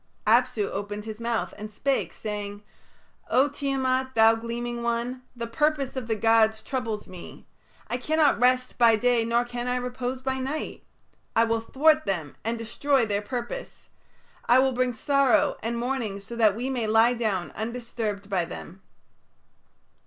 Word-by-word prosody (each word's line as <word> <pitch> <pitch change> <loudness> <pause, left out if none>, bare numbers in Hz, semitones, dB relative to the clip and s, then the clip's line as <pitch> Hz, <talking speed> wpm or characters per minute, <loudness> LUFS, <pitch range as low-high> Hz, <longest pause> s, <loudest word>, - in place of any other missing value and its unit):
Apsu 235 -1 +3
opened 205 +1 -5
his 220 0 -7
mouth 235 -1 -2
and 215 +1 -6
spake, 270 +6 -1
saying, 205 -1 -5 0.7
"O 265 +3 +4
Tiamat, 265 -2 -1
thou 225 0 +7
gleaming 235 +1 -4
one, 235 +2 -2
the 235 -1 -4
purpose 280 +2 0
of 255 -3 -4
the 225 - 0
gods 220 0 +3
troubles 230 -6 -3
me. 180 -2 -11 0.4
I 245 - -2
cannot 310 +2 +2
rest 255 +1 +2
by 230 -2 +6
day 240 +1 +2
nor 235 +1 +1
can 240 0 -5
I 250 - 0
repose 250 +1 -3
by 265 0 -1
night. 275 +4 -4 0.5
I 230 - +5
will 230 0 0
thwart 310 +6 +3
them 165 -7 -2
and 230 +1 -1
destroy 240 +3 +1
their 205 -1 -1
purpose. 250 - -6 0.6
I 245 - +6
will 265 0 +4
bring 250 0 +1
sorrow 280 +4 +2
and 235 +1 -2
mourning 235 -5 -2
so 220 +4 -9
that 215 -4 +4
we 245 +4 -3
may 250 -4 -1
lie 225 +3 +5
down 210 -8 -1
undisturbed 225 -3 -4
by 190 -3 0
them." 175 +2 -9
235 Hz, 160 wpm, -26 LUFS, 220-255 Hz, 0.7 s, thou